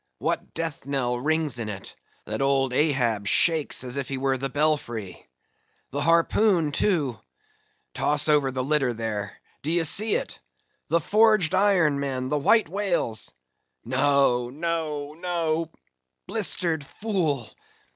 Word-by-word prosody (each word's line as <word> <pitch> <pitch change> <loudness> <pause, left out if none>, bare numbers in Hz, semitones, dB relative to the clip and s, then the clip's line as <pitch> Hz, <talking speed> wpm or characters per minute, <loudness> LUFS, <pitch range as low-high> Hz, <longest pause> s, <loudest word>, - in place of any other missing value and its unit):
—What - - -3
death 165 -4 -4
knell 125 -3 -1
rings 155 -2 0
in 110 -2 -4
it, 100 -2 -8 0.3
that - - -4
old 135 -2 +1
Ahab 125 -8 +1
shakes 160 - +3
as 125 +1 -5
if 140 - -2
he 135 - -3
were 135 0 0
the 135 +1 -2
belfry. 125 -8 -2 0.6
The 145 - -2
harpoon, 165 +1 +3
too!—toss 210 - -2
over 145 -3 +3
the 130 0 -3
litter 135 -3 +1
there,—d'ye 115 - -3
see 210 +7 +2
it?—the 170 - -5
forged 215 -2 +3
iron, 185 -7 +3
men, 130 -2 -3
the 150 - 0
white 220 +8 +3
whale's—no, 125 - -1
no, 150 -1 -3
no,—blistered 160 - -2
fool! 160 - -2
145 Hz, 115 wpm, -25 LUFS, 125-165 Hz, 0.6 s, shakes